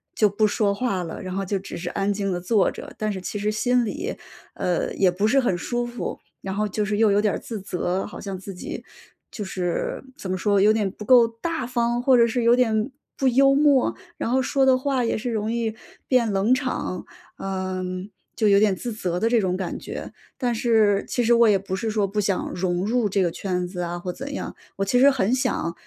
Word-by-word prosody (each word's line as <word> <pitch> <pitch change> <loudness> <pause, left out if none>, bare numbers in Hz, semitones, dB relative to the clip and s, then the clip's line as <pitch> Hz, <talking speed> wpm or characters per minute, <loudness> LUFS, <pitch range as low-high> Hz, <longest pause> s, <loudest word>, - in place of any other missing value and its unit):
就 210 - +4
不 215 +2 +2
说 205 -1 +1
话 200 -4 -1
了， 165 - -6
然 185 0 -5
后 195 - -1
就 195 +1 -1
只 190 - -8
是 175 +1 -4
安 200 +1 0
静 200 -1 -2
地 175 - -1
坐 200 +2 +2
着。 - - -9
但 215 0 -1
是 195 - -4
其 205 - -4
实 210 +1 0
心 245 +3 +2
里， 335 - -4 0.4
呃， 180 -1 -1
也 190 -2 +3
不 200 +4 0
是 270 +5 +4
很 215 -8 +1
舒 240 +7 -2
服， 240 0 -5 0.2
然 190 0 -4
后 210 +1 0
就 210 +1 -1
是 205 0 -1
又 220 -1 +4
有 205 +1 +3
点 210 -2 +1
儿 - - -1
自 220 -4 -6
责， 185 0 -2
好 - - -9
像 195 -2 -5
自 195 +1 -8
己 180 - -7 0.5
就 210 - -5
是 180 +2 -2
怎 190 -9 -5
么 185 - 0
说？ 200 +1 +2
有 210 +2 +6
点 210 -3 0
不 210 - -10
够 240 0 +7
大 245 +4 -4
方？ 240 -1 0
或 255 0 +5
者 235 - +6
是 235 +1 -1
有 235 +1 +6
点 225 -1 +1 0.3
不 270 - +1
幽 275 +2 +5
默？ 280 -2 +3 0.2
然 - - -2
后 260 +2 +2
说 270 +1 +2
的 260 -1 +5
话 265 -1 0
也 230 - 0
是 240 +3 -3
容 215 0 -1
易 230 -2 -1 0.3
变 240 -4 +3
冷 200 +5 +3
场， 255 -8 -2 0.3
嗯， 185 0 -4 0.3
就 220 - +2
有 200 0 +6
点 205 -2 +3
自 235 +6 -5
责 180 -5 -2
的 225 - +2
这 235 -1 +4
种 185 -2 0
感 185 -2 -4
觉。 - - -7 0.2
但 245 -3 0
是 220 -3 +3
其 245 - 0
实 235 +1 +4
我 235 0 +6
也 205 - +5
不 190 0 -4
是 225 +2 -2
说 210 -2 +1
不 205 +2 -2
想 195 -2 -1
融 180 0 -1
入 235 +1 +1
这 195 0 +2
个 175 - +1
圈 180 0 -2
子 180 0 -8
啊 175 0 -3
或 180 +1 -4
怎 275 +7 -7
样。 - - -5 0.2
我 195 - 0
其 245 +6 +2
实 275 +2 +7
很 250 -5 +1
想， 255 -9 0
210 Hz, 255 characters per minute, -24 LUFS, 190-240 Hz, 0.5 s, 够